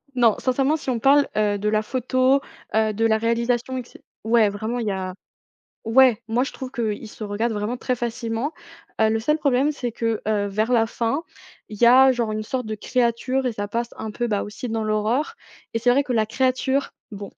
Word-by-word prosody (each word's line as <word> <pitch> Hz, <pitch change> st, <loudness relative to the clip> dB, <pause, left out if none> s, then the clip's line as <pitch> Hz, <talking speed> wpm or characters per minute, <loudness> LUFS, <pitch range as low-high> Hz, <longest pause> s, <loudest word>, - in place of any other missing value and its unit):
non, 235 Hz, -4 st, +4 dB
sincèrement 270 Hz, +4 st, +1 dB
si 275 Hz, -, -6 dB
on 240 Hz, -2 st, 0 dB
parle, 280 Hz, +3 st, +4 dB
heu, 205 Hz, -1 st, +1 dB
de 210 Hz, +1 st, -1 dB
la 215 Hz, 0 st, +2 dB
photo, 255 Hz, +3 st, +1 dB, 0.4 s
heu, 220 Hz, -1 st, +2 dB
de 225 Hz, +2 st, 0 dB
la 220 Hz, -1 st, +3 dB
réalisation 235 Hz, +3 st, 0 dB
et -, -, -2 dB
que 240 Hz, -, -15 dB
c -, -, -16 dB, 0.2 s
ouais 220 Hz, -2 st, +4 dB
vraiment 220 Hz, +4 st, -3 dB
il 225 Hz, -, -3 dB
y -, -, +1 dB
a 185 Hz, -1 st, -4 dB, 0.7 s
ouais, 240 Hz, 0 st, +4 dB
moi 245 Hz, +4 st, +1 dB
je -, -, -6 dB
trouve 260 Hz, -2 st, -7 dB
qu'il 225 Hz, -3 st, -3 dB
se 215 Hz, -, -8 dB
regarde 220 Hz, +3 st, -1 dB
vraiment 210 Hz, +4 st, -2 dB
très 250 Hz, 0 st, -2 dB
facilement, 235 Hz, +4 st, -3 dB, 0.5 s
heu, 220 Hz, -, +5 dB
le 220 Hz, 0 st, 0 dB
seul 300 Hz, +7 st, +1 dB
problème, 280 Hz, 0 st, +2 dB
c'est 245 Hz, -5 st, -4 dB
que, 230 Hz, -2 st, -1 dB
heu, 205 Hz, -2 st, +1 dB
vers 215 Hz, +4 st, -1 dB
la 225 Hz, -2 st, +4 dB
fin, 235 Hz, +6 st, -2 dB, 0.5 s
il 210 Hz, 0 st, -10 dB
y -, -, +8 dB
a 260 Hz, +2 st, +7 dB
genre 235 Hz, -3 st, -1 dB
une 215 Hz, 0 st, -2 dB
sorte 250 Hz, +1 st, -3 dB
de 215 Hz, -, -3 dB
créature 250 Hz, +3 st, 0 dB
et 245 Hz, -, 0 dB
ça 205 Hz, -1 st, -4 dB
passe 235 Hz, +2 st, -2 dB
un 220 Hz, -, -5 dB
peu, 240 Hz, +3 st, -2 dB
bah, 205 Hz, -3 st, 0 dB
aussi 215 Hz, +4 st, -7 dB
dans 225 Hz, -1 st, -2 dB
l'horreur 220 Hz, -, 0 dB, 0.4 s
et 230 Hz, -, 0 dB
c'est 240 Hz, +2 st, +2 dB
vrai 275 Hz, +3 st, +4 dB
que 255 Hz, -, -3 dB
la 220 Hz, -2 st, +2 dB
créature, 260 Hz, +3 st, 0 dB, 0.2 s
bon, 200 Hz, -1 st, -8 dB
235 Hz, 225 wpm, -23 LUFS, 215-255 Hz, 0.7 s, y